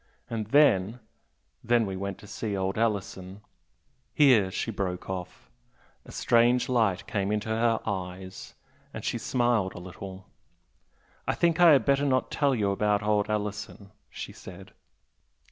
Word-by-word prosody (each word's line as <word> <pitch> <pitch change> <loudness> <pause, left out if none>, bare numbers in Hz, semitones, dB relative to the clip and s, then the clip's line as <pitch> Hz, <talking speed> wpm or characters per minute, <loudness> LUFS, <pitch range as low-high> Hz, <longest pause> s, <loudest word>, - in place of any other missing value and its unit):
And 110 -2 -3
then 115 -5 +3 0.6
then 120 -1 +3
we 95 -1 -4
went 100 0 -4
to - - -14
see 100 0 -4
old 95 0 -1
Alison 100 -3 -2 0.4
" - - -47 0.3
Here 125 -10 +5
she 110 +4 -3
broke 90 -3 -4
off, 90 -1 -7 0.5
a - - -12
strange 120 +1 +3
light 110 -7 +1
came 100 -1 -2
into 105 +1 -2
her 115 0 +1
eyes 95 -2 -6 0.4
and - - -6
she - - -1
smiled 120 -6 0
a - - -7
little. 95 +1 -10 1.0
"I - - +1
think 170 0 +1
I 170 -3 +8
had 135 -5 +3
better 140 +1 +2
not 130 -1 0
tell 140 -2 +2
you 100 -4 0
about 105 +1 +1
old 105 0 +1
Alison!" 105 -1 -4 0.2
she - - -8
said. 95 +1 -12
105 Hz, 150 wpm, -27 LUFS, 95-120 Hz, 1.0 s, I